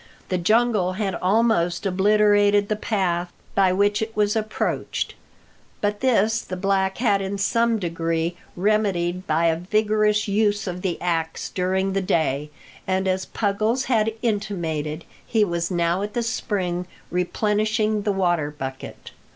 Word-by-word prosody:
The 185 - 0
jungle 215 -1 +2
had 195 -1 -2
almost 190 -3 +1
obliterated 205 +1 +3
the 215 - +1
path 180 -5 -1 0.2
by 190 -2 +4
which 205 +3 +2
it 220 0 -4
was 210 0 +2
approached, 215 -1 -2 0.7
but 205 0 -1
this 225 -3 +2
the 185 - -6
black 190 0 0
had 205 -5 +2
in 195 +1 -3
some 230 +3 +2
degree 165 -2 -2 0.2
remedied 185 -3 0
by 160 +2 +2
a 165 -1 +3
vigorous 210 +4 +1
use 205 0 +1
of 180 -2 -4
the 180 -3 -2
axe 165 -2 -2
during 190 +1 0
the 195 - +1
day, 150 -5 0 0.4
and, 190 0 0
as 190 0 -1
Puggles 215 +4 0
had 225 -4 +1
intimated, 170 -8 -2 0.2
he 220 -3 +2
was 170 -2 -2
now 175 0 +1
at 210 +1 -4
the 240 - 0
spring, 185 -6 -2 0.2
replenishing 210 +4 0
the 205 0 0
water 175 -6 +1
bucket. 135 -3 -8
195 Hz, 145 wpm, -23 LUFS, 175-215 Hz, 0.7 s, by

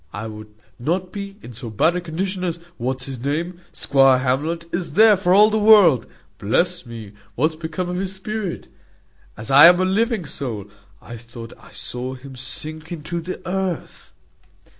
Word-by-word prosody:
I 105 +2 -5
would 110 -1 -9 0.3
not 180 +8 -2
be 200 0 -7
in 125 - -10
so 115 +1 -7
bad 160 - +2
a 180 - -1
condition 185 +3 -3
as 170 -2 -2 0.2
what's 130 +2 -2
his 135 -3 -6
name, 165 +7 -3
squire 135 -1 +4
Hamlet, 145 +7 -1
is 175 0 -3
there, 215 0 +7
for 180 -2 0
all 210 +3 +6
the 220 - +1
world. 205 - +6 0.3
Bless - - 0
me! 115 -4 -9 0.2
what's 155 +5 +1
become 160 +3 -4
of 180 0 -3
the 195 +1 -1
spirit? 195 0 -5 0.7
As 110 +5 -5
I 145 +4 +10
am 175 +1 +6
a 185 - +2
living 215 0 0
soul, 120 -8 -5 0.4
I 120 - -9
thought 115 0 -11
I - - -16
saw 125 +1 -4
him 135 +1 -11
sink 155 +5 -7
into 170 +1 -4
the 185 +2 -7
earth." 185 -2 -4
160 Hz, 175 wpm, -21 LUFS, 130-185 Hz, 0.7 s, I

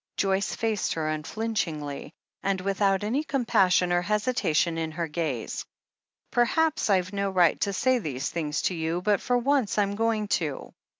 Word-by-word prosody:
Joyce 195 0 0
faced 220 -3 -1
her 160 -1 -1
unflinchingly, 155 -4 -3 0.3
and 195 -1 0
without 195 +1 +1
any 250 +8 0
com 275 -5 -2
passion 180 -4 +3
or 175 - +3
hesitation 180 -6 +1
in 160 -1 -3
her 170 0 -2
gaze. 150 -7 -3 0.7
"Perhaps 310 +4 +2
I've 185 -1 +2
no 200 0 0
right 180 -3 +3
to 200 - +1
say 255 +6 +2
these 140 - -3
things 150 -3 -2
to - - +1
you, 165 +1 -2
but 205 -1 +2
for 245 0 +1
once 255 -3 +1
I'm 200 -1 +2
going 220 -1 0
to. 150 -5 -5
195 Hz, 165 wpm, -27 LUFS, 165-220 Hz, 0.7 s, passion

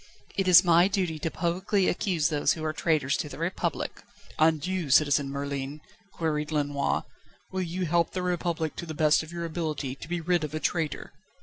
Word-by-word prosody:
"It 195 -1 0
is 180 -1 +8
my 175 0 +5
duty 185 -6 -1
to 165 - -1
publicly 185 +4 0
accuse 175 -6 +1
those 150 -2 +2
who 160 - -6
are 155 - -1
traitors 150 -5 +1
to 150 - -3
the - - -9
Republic." 170 +4 -3 0.4
"And 155 -1 +3
you, 185 -5 -2
Citizen 145 0 +4
Merlin," 140 +1 -4 0.3
queried 150 -3 -2
Lenoir, 145 -2 0 0.5
"will 190 - -2
you 180 +1 -2
help 170 +1 +1
the 185 - -2
Republic 170 -3 -1
to 170 - -5
the 155 - -5
best 155 +1 +4
of 160 0 -10
your 170 0 -4
ability 155 -5 -3
to 135 - -10
be 175 0 -1
rid 175 0 +1
of 150 0 -4
a - - -1
traitor?" 160 -1 -2
160 Hz, 195 wpm, -27 LUFS, 150-175 Hz, 0.5 s, is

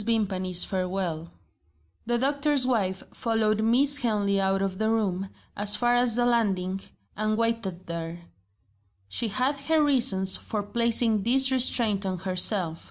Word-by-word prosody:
VIMPANY'S 190 -5 0
FAREWELL 180 -3 -4 0.8
THE 240 0 0
doctor's 280 +1 0
wife 195 -7 -2
followed 220 -2 -1
Miss 270 +6 +6
Henley 205 -6 -1
out 195 0 -1
of 190 -1 -4
the 220 0 0
room, 195 -4 -2 0.3
as 205 0 +3
far 240 +2 0
as 245 -2 +2
the 240 0 +1
landing 195 -6 -1 0.3
and 215 0 -2
waited 230 -6 -3
there. 170 0 -7 0.8
She 160 - -1
had 260 +6 -2
her 310 +2 +1
reasons 235 -10 +2
for 210 -2 -5
placing 230 0 +2
this 265 +5 +3
restraint 235 -5 +2
on 190 -1 -3
herself. 185 -2 +1
215 Hz, 140 wpm, -25 LUFS, 190-240 Hz, 0.8 s, Miss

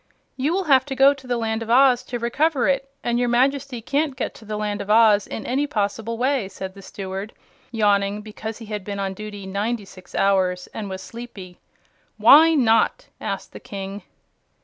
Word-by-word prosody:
"You 270 +4 0
will 385 +2 0
have 270 -6 +5
to 275 -2 -5
go 275 +2 +6
to 270 -2 -14
the 245 -1 0
Land 225 -1 -2
of 230 - -6
Oz 250 0 +5
to 245 - -4
recover 265 +4 +1
it, 270 -1 0
and 240 0 0
your 245 -1 +1
Majesty 260 0 +1
can't 285 +2 0
get - - -3
to 220 - -15
the 215 0 -4
Land 210 -1 -2
of 200 - -8
Oz 215 -2 +5
in 220 - -6
any 275 +4 0
possible 220 -1 -2
way," 255 -4 0
said 190 -1 -7
the 200 - -12
Steward, 195 +2 -6 0.4
yawning 205 -2 +1
because 220 +1 -7
he 230 - -10
had 210 -2 -5
been 200 0 -5
on 195 -1 -2
duty 205 0 -8
ninety 205 +3 -2
six 185 -2 -14
hours, 185 -2 +2
and 210 -3 -5
was 190 0 -6
sleepy. 220 -7 -10 0.6
"Why 320 +3 +7
not?" 245 - +2
asked - - -5
the - - -8
King. 195 0 -7
225 Hz, 195 wpm, -22 LUFS, 200-260 Hz, 0.6 s, Why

